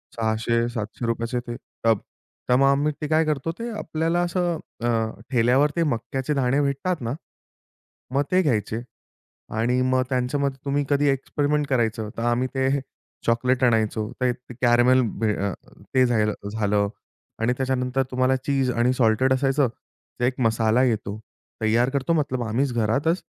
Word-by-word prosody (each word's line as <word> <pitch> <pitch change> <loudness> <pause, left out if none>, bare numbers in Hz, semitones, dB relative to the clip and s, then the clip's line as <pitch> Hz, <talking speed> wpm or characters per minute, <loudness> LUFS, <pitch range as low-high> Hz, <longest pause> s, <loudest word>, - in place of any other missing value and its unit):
600-700 115 0 -1
रुपयाचे 115 +1 -1
ते 120 - -4 0.3
टब. 115 -2 +4 0.5
त्यामुळे 135 +2 +4
आम्ही 145 +2 +2
ते 150 - -2
काय 160 +1 +3
करतो. 155 +1 -1
ते 235 - -3
आपल्याला 165 0 -1
असं 175 -2 -1 0.2
अ, 120 - +1 0.4
ठेल्यावर 125 +5 +3
ते 170 - +2
मक्याचे 135 +1 -2
दाणे 135 0 +2
भेटतात 140 +4 -1
ना, 115 +1 -2 1.0
मग 140 +2 +2
ते 185 - +4
घ्यायचे 115 -4 0 0.8
आणि 125 +3 +2
मग 130 0 +2
त्यांच्यामध्ये 135 +2 0
तुम्ही 140 +1 +1
कधी 145 0 +2
एक्सपेरिमेंट 145 +2 0
करायचं, 110 -5 0
तर 115 - -2
आम्ही 120 +2 +1
ते 130 0 +2 0.6
चॉकलेट 125 +2 +2
आणायचो 110 -1 +1
ते 125 -1 +3 0.3
कॅरामेल 120 +1 +5 0.2
बे 110 -2 +2
अ 100 - -1 0.4
ते 130 - +6
झायल 110 -3 +2 0.2
झालं 105 -2 +1 0.5
आणि 120 +2 +2
त्याच्यानंतर 130 0 0
तुम्हाला 130 +1 +2
चीज 135 0 0
आणि 120 +1 +2
सॉल्टेड 125 +2 +3
असायचं, 135 +1 +2 0.5
तर 120 - -2
एक 125 +1 -1
मसाला 115 +1 +3
येतो. 110 -4 -1 0.5
तयार 115 +3 +3
करतो 140 +4 0
मतलब 140 -6 0
आम्हीच 125 +4 0
घरातच 135 - +1
130 Hz, 145 wpm, -24 LUFS, 115-140 Hz, 1.0 s, ते